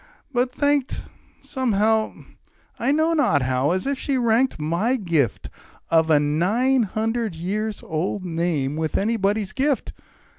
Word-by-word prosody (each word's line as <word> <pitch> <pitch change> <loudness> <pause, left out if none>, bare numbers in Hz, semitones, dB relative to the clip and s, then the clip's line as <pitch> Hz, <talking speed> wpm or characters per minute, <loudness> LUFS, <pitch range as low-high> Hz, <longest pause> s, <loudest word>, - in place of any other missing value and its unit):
but 250 +1 +1
thanked 285 0 0 0.4
Somehow 220 -4 0 0.6
I - - +1
know 315 +3 +2
not 245 - +2
how 130 +2 +1
as 185 +2 0
if 275 -1 -1
she 275 -2 -1
ranked 240 +2 +2
My 170 +11 0
gift 170 - 0 0.4
of 160 -1 +4
a 150 -2 +5
nine 200 - +2
hundred 220 -1 -1
years 210 +6 -3
old 180 +4 -3
name 165 -5 -1
With 160 -1 -1
anybody's 205 -1 0
gift. 275 +2 -1
210 Hz, 135 wpm, -23 LUFS, 165-250 Hz, 0.6 s, a